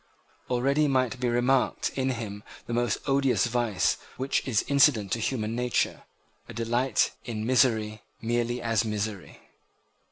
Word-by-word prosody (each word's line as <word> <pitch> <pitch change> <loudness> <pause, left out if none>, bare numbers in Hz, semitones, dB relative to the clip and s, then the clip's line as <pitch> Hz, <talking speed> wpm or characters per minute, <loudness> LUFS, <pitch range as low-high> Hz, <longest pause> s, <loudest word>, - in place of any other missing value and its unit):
Already 140 +5 +2
might 130 -3 +1
be 125 -1 0
remarked 125 +2 +1
in 130 -1 0
him 110 -5 -4 0.2
the 120 - -5
most 120 -1 +1
odious 135 -2 +2
vice 120 -5 +1 0.2
which 135 +1 0
is 115 -5 +1
incident 140 -8 +4
to 115 - 0
human 110 -1 -2
nature, 125 0 -1 0.4
a - - -9
delight 120 +1 +1
in 110 -3 -4
misery 110 -4 +2 0.2
merely 120 +1 -1
as 115 -2 +1
misery. 105 -3 -4
120 Hz, 135 wpm, -27 LUFS, 110-130 Hz, 0.4 s, incident